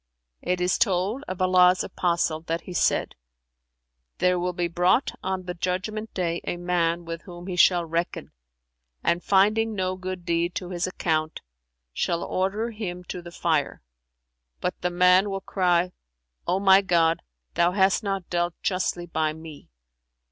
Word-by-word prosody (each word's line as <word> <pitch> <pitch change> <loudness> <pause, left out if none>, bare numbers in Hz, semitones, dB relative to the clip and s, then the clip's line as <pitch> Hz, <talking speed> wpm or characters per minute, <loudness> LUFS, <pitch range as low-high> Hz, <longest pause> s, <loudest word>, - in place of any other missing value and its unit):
It 180 0 -1
is 180 0 +1
told 200 +5 +1
of 185 0 -2
Allah's 185 0 +5
Apostle 170 -3 0
that 165 +1 -1
he 180 - -9
said, - - +1 1.0
'There 180 0 +2
will 180 +1 -1
be 175 -1 -1
brought 180 +9 +2
on 190 -1 -2
the 180 0 -5
Judgment 185 +5 -3
day 170 -2 -1
a 175 - -3
man 175 -1 0
with 165 0 -5
whom 175 -1 -10
He 185 -1 -4
shall 175 -1 +4
reckon 165 +1 -3 0.7
and 170 +1 +1
finding 215 +3 +3
no 185 -1 -1
good 185 -1 -6
deed 170 +1 0
to 180 - -4
his 175 0 -1
account, 160 -4 -1 0.5
shall 170 -1 -1
order 205 +5 -1
him 180 -5 -5
to 180 - -5
the 175 - -10
Fire; 160 - -1 0.8
but 180 - -1
the 180 - 0
man 180 +3 +4
will 195 0 -3
cry, 180 -2 +1 0.6
'O 185 +2 +1
my 195 0 +6
God, 165 -3 +2 0.3
Thou 175 +1 +2
hast 190 +1 +3
not 195 -4 -3
dealt 175 0 -1
justly 185 -2 -1
by 160 -2 -1
me!' 160 -2 -11
180 Hz, 155 wpm, -25 LUFS, 170-190 Hz, 1.0 s, my